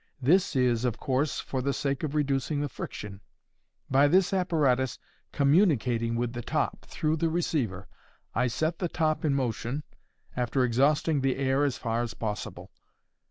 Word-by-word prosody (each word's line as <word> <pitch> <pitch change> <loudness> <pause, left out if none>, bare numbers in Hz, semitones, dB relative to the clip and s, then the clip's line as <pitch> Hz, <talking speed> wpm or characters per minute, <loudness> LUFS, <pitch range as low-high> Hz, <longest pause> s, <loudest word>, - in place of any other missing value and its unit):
This 170 +7 +3
is, 125 -3 +2
of 120 -3 0
course, 135 +1 0
for 130 - -3
the 140 +2 0
sake 140 -1 -1
of 155 -1 -3
reducing 145 0 0
the 145 - -1
friction. 100 -4 -7 0.7
By 135 +2 +4
this 185 +5 +3
apparatus 145 -9 +1 0.3
communicating 135 - +2
with 120 0 -1
the 120 - -4
top, - - -2
through 155 +1 -1
the 165 +1 +1
receiver, 135 - -1 0.5
I 125 +2 +2
set 155 +7 -1
the 175 - -1
top 155 -2 0
in 145 -3 +2
motion—after 125 0 -3
exhausting 140 +5 +2
the 135 -1 +1
air 135 +1 +1
as 140 -3 0
far 115 -1 -1
as 115 -2 -4
possible. 105 -2 -5
135 Hz, 155 wpm, -28 LUFS, 120-155 Hz, 0.7 s, By